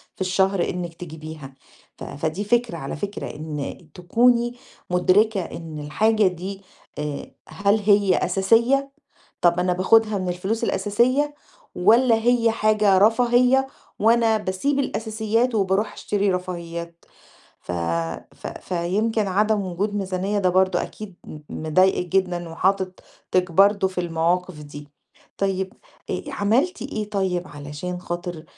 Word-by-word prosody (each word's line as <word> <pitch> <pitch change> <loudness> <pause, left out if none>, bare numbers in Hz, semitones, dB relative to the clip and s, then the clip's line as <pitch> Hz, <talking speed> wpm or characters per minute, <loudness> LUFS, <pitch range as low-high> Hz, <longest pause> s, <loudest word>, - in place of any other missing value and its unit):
في - - -13
الشهر 190 0 +2
إنِك 175 -2 -4
تجيبيها 155 -4 -9 0.4
ف - - -9
فدي 160 +7 -3
فكرة 235 -3 +1
على 135 -2 -5
فكرة، 200 +2 -5
إن 150 -2 -5 0.2
تكوني 235 +6 +2 0.4
مُدركة 190 +3 +3
إن 165 -2 -7
الحاجة 210 +8 +2
دي 190 +2 -5 0.4
آآ، 150 -1 -5 0.2
هل 200 +2 +1
هي 200 -2 +4
أساسية؟ 235 +9 +2 0.5
طَب 175 0 +4
أنا 180 0 +1
باخدها 215 +3 +3
من 185 -1 -2
الفلوس 190 +6 -2
الأساسية؟ 255 +9 +1 0.4
والّا 230 +6 +5
هي 230 0 +2
حاجة 215 -3 +3
رفاهية 245 +5 +4 0.3
وأنا 225 0 +4
باسيب 215 +9 -1
الأساسيات 225 -1 0
وباروح 195 +1 +1
أشتري 205 -1 0
رفاهيات؟ 170 -2 -5 0.6
ف 90 - -7 0.6
ف - - -10
فيمكن 200 +5 -1
عدم 210 +2 +2
وجود 200 +4 -2
ميزانية 195 +1 -1
ده 185 -2 +2
برضه 185 +1 +2
أكيد 210 -4 -8
م 155 - -9
مضايقِك 180 +3 +2
جدًا 175 -3 -1
وحاطِك 185 -1 -1
برضه 195 +1 +4
في 185 -1 -3
المواقف 170 0 -1
دي. 145 0 -10 0.5
طيب، 190 -1 -1 0.4
آآ، - - -2
عملتِ 260 - 0
إيه 210 -1 -4
طيب 185 -3 -1
علشان 150 +5 -6
خاطر 175 -2 -5
190 Hz, 125 wpm, -23 LUFS, 175-220 Hz, 0.6 s, والّا